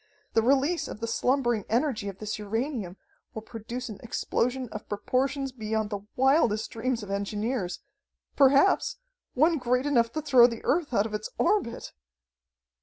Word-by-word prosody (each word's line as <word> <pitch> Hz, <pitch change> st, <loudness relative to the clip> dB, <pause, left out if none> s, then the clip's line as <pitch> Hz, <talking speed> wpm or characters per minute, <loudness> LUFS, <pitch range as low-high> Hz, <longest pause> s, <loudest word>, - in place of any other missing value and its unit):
The 225 Hz, -, +4 dB
release 280 Hz, +8 st, +2 dB
of -, -, -8 dB
the 230 Hz, -, -2 dB
slumbering 240 Hz, -1 st, +1 dB
energy 240 Hz, -3 st, 0 dB
of 195 Hz, -, -9 dB
this 215 Hz, +1 st, -4 dB
uranium 215 Hz, -, -3 dB, 0.4 s
will 220 Hz, -, -5 dB
produce 235 Hz, +2 st, -6 dB
an 215 Hz, -4 st, -8 dB
explosion 250 Hz, +2 st, -1 dB
of 210 Hz, -1 st, -8 dB
proportions 265 Hz, +6 st, -1 dB
beyond 220 Hz, -3 st, -2 dB
the 205 Hz, -, -2 dB, 0.2 s
wildest 255 Hz, -5 st, +2 dB
dreams 235 Hz, 0 st, -2 dB
of 200 Hz, -, -7 dB
engineers 200 Hz, 0 st, -2 dB, 0.5 s
perhaps, 280 Hz, +6 st, +4 dB, 0.4 s
one 315 Hz, +4 st, +3 dB
great 250 Hz, +1 st, +1 dB
enough 235 Hz, -5 st, +2 dB
to 310 Hz, -, -2 dB
throw 255 Hz, -5 st, +7 dB
the 230 Hz, -2 st, -6 dB
Earth 320 Hz, -2 st, +1 dB
out 215 Hz, -4 st, +2 dB
of 220 Hz, -, -6 dB
its 210 Hz, 0 st, -3 dB
orbit!" 360 Hz, -, 0 dB
240 Hz, 155 wpm, -27 LUFS, 215-265 Hz, 0.5 s, throw